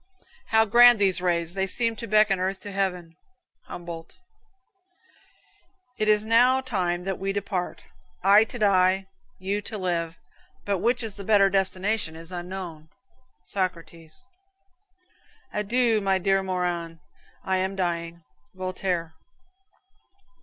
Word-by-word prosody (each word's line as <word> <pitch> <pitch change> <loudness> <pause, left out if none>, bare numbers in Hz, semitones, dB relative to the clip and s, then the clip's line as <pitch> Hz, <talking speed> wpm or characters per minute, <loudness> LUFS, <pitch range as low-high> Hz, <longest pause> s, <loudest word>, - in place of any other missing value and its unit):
"How 220 0 +4
grand 240 +2 +7
these 195 -3 +2
rays. 170 -2 0
They 190 0 -1
seem 230 +3 +1
to 230 - -6
beckon 215 -2 +3
earth 190 +1 -1
to 205 - -7
heaven." 180 -4 -2 0.5
Humboldt. 170 -1 -9 1.8
"It 215 - 0
is 210 0 +3
now 245 +4 +4
time 185 -9 -2
that 195 0 -3
we 195 +1 -2
depart 195 -2 -4 0.4
I 200 +3 +7
to 245 - -7
die, 190 -2 +3 0.3
you 195 +2 -2
to 215 +1 -6
live: 170 -3 -2 0.5
but 200 -2 0
which 240 +3 +1
is 215 -3 -5
the 200 - -7
better 200 -1 +4
destination 190 -2 0
is 165 +2 -9
unknown." 175 -3 -7 0.5
Socrates. 170 -2 -5 1.3
"Adieu, 225 +1 +1
my 195 -1 +2
dear 195 +1 +1
Morand, 175 -3 -3 0.5
I 190 0 0
am 190 +1 -2
dying." 170 -2 -3 0.3
Voltaire. 185 -3 -3
190 Hz, 125 wpm, -25 LUFS, 175-210 Hz, 1.8 s, grand